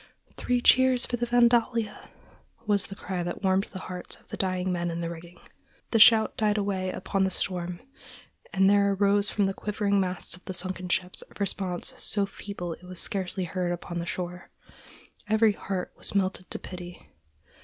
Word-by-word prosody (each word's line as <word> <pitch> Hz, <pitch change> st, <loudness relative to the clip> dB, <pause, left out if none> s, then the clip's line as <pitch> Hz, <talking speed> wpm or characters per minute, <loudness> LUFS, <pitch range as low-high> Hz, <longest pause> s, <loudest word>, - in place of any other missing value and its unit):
"Three 245 Hz, -1 st, 0 dB
cheers 255 Hz, 0 st, +5 dB
for 245 Hz, -, -2 dB
the 240 Hz, 0 st, -1 dB
Vandalia!" 235 Hz, -2 st, +2 dB, 0.6 s
was 205 Hz, -2 st, +2 dB
the 195 Hz, -, -8 dB
cry 185 Hz, -2 st, -4 dB
that 175 Hz, +3 st, -4 dB
warmed 190 Hz, +1 st, +3 dB
the 190 Hz, -, -7 dB
hearts 180 Hz, -1 st, -6 dB
of -, -, -24 dB
the -, -, -4 dB
dying 185 Hz, -1 st, -1 dB
men 175 Hz, -1 st, -1 dB
in 170 Hz, 0 st, -3 dB
the 170 Hz, 0 st, -3 dB
rigging. 170 Hz, +1 st, -10 dB, 0.5 s
The 225 Hz, -, +3 dB
shout 220 Hz, 0 st, +7 dB
died 210 Hz, -1 st, +1 dB
away 195 Hz, -2 st, -1 dB
upon 190 Hz, +1 st, -1 dB
the 190 Hz, -, +2 dB
storm, 180 Hz, -2 st, -3 dB, 0.7 s
and 190 Hz, 0 st, +4 dB
there 200 Hz, 0 st, +4 dB
arose 200 Hz, +1 st, +3 dB
from 205 Hz, -, +1 dB
the 195 Hz, 0 st, +1 dB
quivering 205 Hz, 0 st, 0 dB
masts 185 Hz, -2 st, -2 dB
of 180 Hz, -, -17 dB
the 185 Hz, -, -4 dB
sunken 185 Hz, 0 st, -3 dB
ship 180 Hz, +1 st, 0 dB
a -, -, -19 dB
response 190 Hz, -3 st, -2 dB
so 205 Hz, -1 st, +1 dB
feeble 195 Hz, -3 st, -6 dB
it 175 Hz, -, -14 dB
was 180 Hz, 0 st, -4 dB
scarcely 190 Hz, -1 st, -2 dB
heard 180 Hz, 0 st, -2 dB
upon 175 Hz, 0 st, -4 dB
the 170 Hz, -, -4 dB
shore. 180 Hz, 0 st, -5 dB, 0.8 s
Every 220 Hz, 0 st, +5 dB
heart 190 Hz, -2 st, -4 dB
was -, -, -2 dB
melted 185 Hz, -2 st, 0 dB
to -, -, -1 dB
pity. 180 Hz, -1 st, -9 dB
190 Hz, 185 wpm, -27 LUFS, 180-205 Hz, 0.8 s, shout